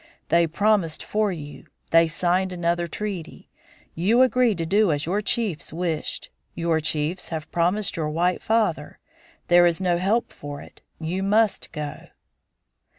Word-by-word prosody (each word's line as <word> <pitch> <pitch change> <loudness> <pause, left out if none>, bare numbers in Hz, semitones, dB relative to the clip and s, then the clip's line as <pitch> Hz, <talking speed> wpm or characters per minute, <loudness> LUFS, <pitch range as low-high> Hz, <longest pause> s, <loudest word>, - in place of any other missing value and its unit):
They 170 +1 +4
promised 195 -1 +1
for 210 -1 0
you. 150 -4 -9 0.2
They 165 0 +6
signed 180 +3 0
another 175 -1 -1
treaty. 195 -1 -6 0.4
You 220 +10 +3
agreed 250 -5 +2
to 165 - -2
do 200 +2 +3
as 145 0 -1
your 195 +5 0
chiefs 215 -6 -1
wished. 165 -1 -3 0.2
Your 165 -1 +1
chiefs 155 +3 -2
have 160 -1 -5
promised 180 +5 +1
your 155 -2 -1
white 175 +4 0
father. 215 -10 0 0.5
There 175 0 +6
is 170 0 +1
no 175 -2 +1
help 210 +6 0
for 145 0 -8
it. - - -14 0.2
You 170 +4 -3
must 210 +2 +1
go." 150 0 -6
175 Hz, 150 wpm, -24 LUFS, 160-205 Hz, 0.5 s, They